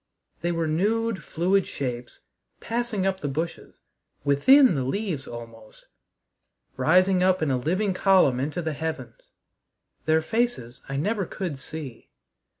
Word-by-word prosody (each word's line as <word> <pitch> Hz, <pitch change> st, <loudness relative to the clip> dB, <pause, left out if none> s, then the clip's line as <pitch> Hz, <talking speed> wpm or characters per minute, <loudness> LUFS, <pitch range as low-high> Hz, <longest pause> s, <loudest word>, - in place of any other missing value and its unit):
They 175 Hz, -, 0 dB
were 165 Hz, -1 st, -1 dB
nude, 210 Hz, +7 st, 0 dB
fluid 185 Hz, +4 st, +1 dB
shapes, 125 Hz, -3 st, -5 dB, 0.4 s
passing 230 Hz, -4 st, -2 dB
up 190 Hz, -1 st, 0 dB
the 145 Hz, -, -3 dB
bushes, 160 Hz, +5 st, -5 dB, 0.4 s
within 245 Hz, -, +6 dB
the 135 Hz, -4 st, -1 dB
leaves 160 Hz, 0 st, -3 dB
almost 115 Hz, -2 st, -11 dB, 0.9 s
rising 185 Hz, +3 st, +3 dB
up 185 Hz, -2 st, +3 dB
in 145 Hz, -, +1 dB
a 130 Hz, -, +1 dB
living 185 Hz, +8 st, 0 dB
column 185 Hz, -10 st, +4 dB
into 150 Hz, +6 st, -2 dB
the 160 Hz, -1 st, -2 dB
heavens. 160 Hz, -, -6 dB, 0.8 s
Their 160 Hz, 0 st, +3 dB
faces 225 Hz, -, -2 dB
I 140 Hz, -, -3 dB
never 200 Hz, +4 st, -1 dB
could 175 Hz, -8 st, -5 dB
see. 140 Hz, -5 st, -8 dB
165 Hz, 135 wpm, -25 LUFS, 140-195 Hz, 0.9 s, within